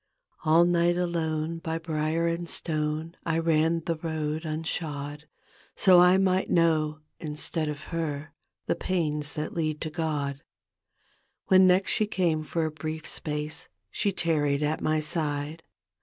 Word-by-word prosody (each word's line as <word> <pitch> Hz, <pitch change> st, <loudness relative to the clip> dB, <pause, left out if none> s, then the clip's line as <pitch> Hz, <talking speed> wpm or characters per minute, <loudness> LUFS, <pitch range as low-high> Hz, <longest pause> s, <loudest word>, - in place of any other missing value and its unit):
All 165 Hz, +2 st, +6 dB
night 175 Hz, 0 st, +3 dB
alone 165 Hz, -2 st, -1 dB
by 160 Hz, 0 st, -3 dB
brier 160 Hz, 0 st, -1 dB
and 170 Hz, 0 st, -1 dB
stone 155 Hz, +1 st, -2 dB
I 165 Hz, -1 st, 0 dB
ran 165 Hz, 0 st, +2 dB
that 165 Hz, 0 st, -3 dB
road 155 Hz, 0 st, -2 dB
unshod, 150 Hz, -2 st, -3 dB, 0.5 s
Sd 185 Hz, -2 st, +7 dB
I 180 Hz, +1 st, +6 dB
might 190 Hz, -1 st, +2 dB
know 155 Hz, -2 st, +2 dB, 0.2 s
instead 155 Hz, +1 st, -2 dB
of 150 Hz, 0 st, -5 dB
her 155 Hz, -3 st, -3 dB, 0.3 s
The -, -, +1 dB
pains 150 Hz, -5 st, -1 dB
that 150 Hz, -1 st, -4 dB
lead 155 Hz, -2 st, -1 dB
to 155 Hz, -, -2 dB
God. 145 Hz, -4 st, -2 dB, 1.1 s
When 185 Hz, 0 st, +7 dB
next 185 Hz, +2 st, +3 dB
she 215 Hz, -, +1 dB
came 170 Hz, -6 st, +1 dB
for 160 Hz, +1 st, -1 dB
a 155 Hz, -, -2 dB
brief 155 Hz, +1 st, -5 dB
space 150 Hz, 0 st, -3 dB, 0.2 s
She 200 Hz, -, 0 dB
tarried 150 Hz, -5 st, +1 dB
at 150 Hz, +1 st, 0 dB
my 155 Hz, 0 st, +1 dB
side. 155 Hz, -1 st, -2 dB
160 Hz, 140 wpm, -27 LUFS, 150-170 Hz, 1.1 s, Sd